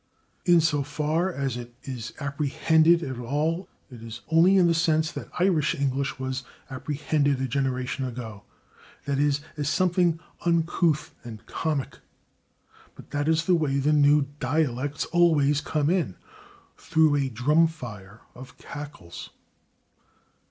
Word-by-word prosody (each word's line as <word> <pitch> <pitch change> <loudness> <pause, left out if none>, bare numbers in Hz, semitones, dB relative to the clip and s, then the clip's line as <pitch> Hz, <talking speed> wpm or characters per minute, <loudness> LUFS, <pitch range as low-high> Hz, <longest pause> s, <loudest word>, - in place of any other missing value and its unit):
In 175 -2 +6
so 155 -2 +1
far 155 +5 -1
as 135 -6 -2
it 120 0 -8
is 125 -3 -6
apprehended 155 +4 +2
at 130 -4 -5
all 155 +8 -1 0.2
it 120 -3 -11
is 115 0 -8
only 170 +4 +5
in 180 - +5
the 170 - +4
sense 160 -1 +1
that - - -7
Irish 175 -5 +2
English 140 0 -1
was 130 0 -3 0.3
apprehended 145 +1 0
a 130 - -1
generation 130 0 -2
ago 115 -5 -6 0.6
that 140 -1 -1
is, 145 0 +2 0.2
as 145 -1 -1
something 175 -1 +2 0.2
[Pg321] - - -15
uncouth 165 -2 +1
and 115 -2 -10
comic. 150 -1 -3 1.0
But - - -15
that 145 +1 -1
is 160 0 +2
the 185 - +3
way 150 -5 +1
that 145 +2 +2
new 145 0 +5 0.2
dialects 140 0 -1
always 150 -5 +3
come 150 0 0
in 165 - 0 0.6
through 155 -2 +2
a 135 -2 0
drum 150 +8 +3
fire 110 -9 -10
of 125 +1 -12
cackles. 145 - -9
145 Hz, 140 wpm, -26 LUFS, 130-160 Hz, 1.0 s, In